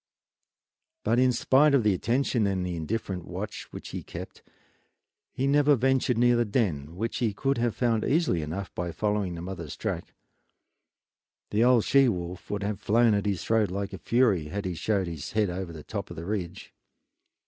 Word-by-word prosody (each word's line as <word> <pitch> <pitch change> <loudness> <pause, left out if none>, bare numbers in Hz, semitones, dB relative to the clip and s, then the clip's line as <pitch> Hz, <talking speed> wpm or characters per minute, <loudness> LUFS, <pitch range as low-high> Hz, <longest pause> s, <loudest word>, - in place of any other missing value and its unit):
But 120 - +2
spite 140 +4 +4
of 130 - +3
the 105 -2 +3
attention 115 +2 +1
and 95 -2 -1
the 90 -1 -3
indifferent 90 +2 -3
watch - - -6
which - - -8
he - - -5
kept, - - -9 0.9
he 135 - -2
never 145 +1 +4
ventured 130 -1 +2
near 120 +1 +4
the 120 - +3
den, 85 - -1
which 110 +5 -2
he 110 -5 0
could 135 +2 0
have 120 -2 0
found 115 -3 +1
easily 145 - +1
enough 90 +6 -5
by 85 -1 -3
following 105 -4 -1
the 85 - -7
mother's 85 -5 -6
track. - - -4 1.4
The 105 +2 +3
old 125 -2 +4
she 135 -2 +5
wolf 90 -3 -5
would 105 0 -2
have 100 -1 -3
flown 115 +1 +4
at 100 0 0
his 100 -5 -1
throat 110 -2 +2
like 100 +2 -4
a - - -6
fury 115 -10 +2
had 100 +6 -4
he 90 - -2
showed 95 +4 0
his 85 -4 -6
head 105 -4 +1
over 90 -1 -4
the 80 -2 -9
top - - -5
of - - -8
the 80 - -7
ridge. 95 -4 -4
105 Hz, 185 wpm, -27 LUFS, 90-120 Hz, 1.4 s, she